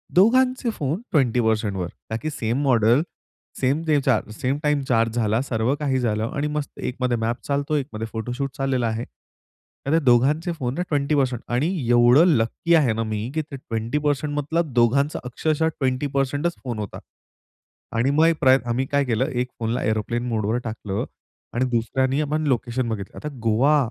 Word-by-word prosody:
दोघांचे 250 +6 +4
फोन 155 +2 -3
20%वर 110 - +1 0.2
का 110 - -2
की 155 - -2
सेम 120 -2 -2
मॉडेल, 120 -1 +4 0.6
सेम 135 +4 +2
ते 150 -2 +4
चा 130 -5 +3
सेम 130 +5 -1
टाईम 150 -1 +2
चार्ज 115 -1 +2
झाला. 110 0 +1
सर्व 120 -1 0
काही 135 -3 0
झालं 110 -2 0
आणि 145 +1 0
मस्त 150 -1 -4
एकमध्ये 125 -1 -1
मॅप 115 +1 -1
चालतो. 140 +2 0
एकमध्ये 125 -6 -3
फोटोशूट 125 +5 -3
चाललेला 130 -3 0
आहे. 110 +2 -2 0.8
तर - - +1
ते 165 - +5
दोघांचे 140 +8 +3
फोन 125 -6 -3
ना 175 - -2
20% 140 -4 +1
आणि 125 +6 +1 0.2
एवढं 120 +6 +6
लकी 115 +9 0
आहे 140 -8 +3
ना 115 +1 -1
मी, 110 +1 -3
की 155 - +1
ते 150 -2 -9
ट्वेंटी 115 +1 -3
पर्सेंट 145 0 0
मतलब 150 0 -1
दोघांचा 125 +5 +2
अक्षरशः 155 +5 0
20%च 140 +4 0
फोन 120 -5 -4
होता 105 -2 -5 1.0
आणि 125 +4 +2
मग 155 +3 +4
एक 165 -1 +2
प्रयत्न, 130 -3 +4
आम्ही 125 +3 0
काय 140 0 +1
केलं, 120 0 +1
एक 125 -1 -1
फोनला 115 +1 -1
एअरोप्लेन 115 +2 -1
मोडवर 110 -1 0
टाकलं 105 -3 -4 0.5
आणि 125 +2 +1
दुसऱ्याने 130 +4 +1
आपण 155 +1 -1
लोकेशन 120 -1 0
बघितलं. 100 -3 -5
आता 150 - -5
गोवा 120 +7 +3
130 Hz, 170 wpm, -23 LUFS, 115-145 Hz, 1.0 s, एवढं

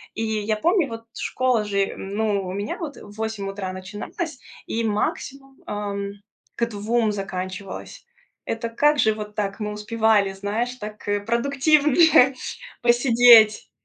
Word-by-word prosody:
И - - -3
я 215 -1 -1
помню, 340 - +2
вот, 225 0 -7
школа 255 -4 0
же 200 -1 0
ну, 200 0 -1
у - - -4
меня 205 +2 -3
вот 305 -4 -6
в 205 - -12
8 220 -3 -3
утра 195 -1 -5
начиналась 210 - -6 0.3
и 230 - -2
максимум, 270 +5 -3
ам, 200 -1 -3 0.4
к 235 - +1
2 220 +1 0
заканчивалась. 190 - -6 0.4
Это 230 +1 -3
как 295 +5 +2
же 220 - +4
вот 210 -1 -8
так 200 0 -2
мы 210 - -2
успевали, 210 -2 +1
знаешь, 215 +6 -3
так, 215 -3 -9
э, 205 0 +1
продуктивнее 275 +4 +4 0.5
посидеть. 240 -3 +6
220 Hz, 140 wpm, -23 LUFS, 205-245 Hz, 0.5 s, посидеть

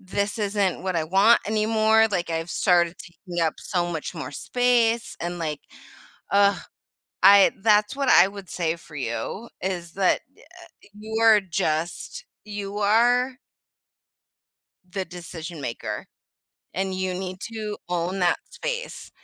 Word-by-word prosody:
this 200 +3 -2
isn't 200 -3 0
what 185 -2 -1
I 160 - 0
want 195 +8 +5
anymore, 220 +1 +3
like, 175 -4 -1
I've 165 +1 -3
started 175 -2 +2
taking 175 0 -6
up 160 - 0
so 175 -2 -2
much 160 +3 -5
more 155 - -6
space, 235 - +1
and 175 0 -4
like, 155 -3 -3 0.7
ugh, 200 -1 +4 0.7
I 200 0 +8
that's 210 +3 +3
what 275 -2 0
I 180 - +7
would 200 -2 -10
say 165 -2 -1
for 160 -2 -15
you, 130 - -4
is 175 -3 -4
that, 190 -2 +2 0.2
uh - - -22
uh, - - -18 0.5
you 220 +2 -5
are 220 -2 +7
just 175 - -3 0.2
you 205 -1 -5
are 245 +5 +3 1.5
the 190 +1 -4
decision 170 -2 -8
maker, 115 - -5 0.7
and 190 0 -1
you 185 -1 -2
need 185 0 -5
to 215 -2 -4
own 175 +2 -2
that 175 -1 +3
space, - - -5
190 Hz, 140 wpm, -24 LUFS, 175-215 Hz, 1.5 s, I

